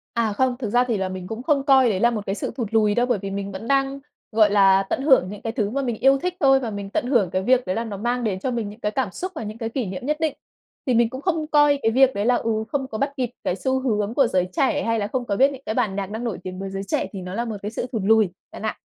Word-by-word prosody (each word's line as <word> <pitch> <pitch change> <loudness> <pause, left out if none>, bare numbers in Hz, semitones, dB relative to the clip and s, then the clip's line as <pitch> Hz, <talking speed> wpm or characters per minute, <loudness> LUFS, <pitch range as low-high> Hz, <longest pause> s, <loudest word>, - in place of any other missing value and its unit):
À, 225 -3 +1
không, 255 +3 +1
thực 235 -5 -3
ra 245 +4 +3
thì 230 -4 0
là 190 -1 -2
mình 185 -1 -6
cũng 225 +4 -6
không 285 -1 +2
coi 265 -3 +5
đấy 195 -4 0
là 235 +3 +4
một 215 -3 -4
cái 195 - -2
sự - - -4
thụt 240 -4 -2
lùi 210 -2 +3
đâu, 240 - +3
bởi 245 -4 0
vì 195 0 -5
mình 200 0 -4
vẫn 195 +4 -7
đang, 275 0 +1 0.3
gọi 215 -2 +4
là, 195 -1 +5
tận - - -1
hưởng 265 - +4
những 205 0 -8
cái 225 - -4
thứ 215 -6 -1
mà 275 +5 -1
mình 245 -4 -2
yêu 270 +1 +5
thích 360 +4 -2
thôi 270 -2 +5
và 245 -4 -3
mình 200 -2 -6
tận 225 - -1
hưởng 235 -9 +2
cái 185 +1 -1
việc 255 +3 +3
đấy 185 0 -1
là 230 - -1
nó 215 -4 -6
mang 240 +4 -1
đến 200 -5 -1
cho 255 - -2
mình 230 -4 -2
những 210 +3 -12
cái 210 -2 -1
cảm 240 -3 -1
xúc 370 - -5
và 310 - -4
những 215 +1 -6
cái 225 -1 -3
kỷ 245 +1 -2
niệm 190 +5 -6
nhất 300 +2 0
định. 315 -2 0 0.5
Thì 255 - +1
mình 235 -1 +3
cũng 260 +3 -7
không 320 -2 -1
coi 295 -2 +4
cái 225 - +2
việc 265 +2 +4
đấy 200 +1 -1
là, 245 +1 +4
ừ, 220 -2 -1
không 270 -2 -1
có 220 - -5
bắt 275 +4 0
kịp 250 -2 -1
cái 180 - 0
xu 260 +5 0
hướng 215 -4 -1
của 270 0 +4
giới 185 -5 0
trẻ, 280 +6 +1
hay 230 0 0
là 205 - -1
không 250 +2 -3
có 205 - -1
biết 270 +6 +4
những 270 -2 -9
cái 220 - -2
bản 220 -6 0
nhạc 195 -1 -3
đang 220 +2 -4
nổi 230 -6 -2
tiếng 185 0 -6
với 195 0 -4
giới 195 0 -4
trẻ 195 - -1
thì 195 - -5
nó 180 0 -7
là 235 +4 -2
một 220 -3 -4
cái 210 - -4
sự 235 - -4
thụt 225 -5 -2
lùi, 220 -2 +4 0.2
bạn - - -9
ạ. - - -3
230 Hz, 330 wpm, -23 LUFS, 205-260 Hz, 0.5 s, coi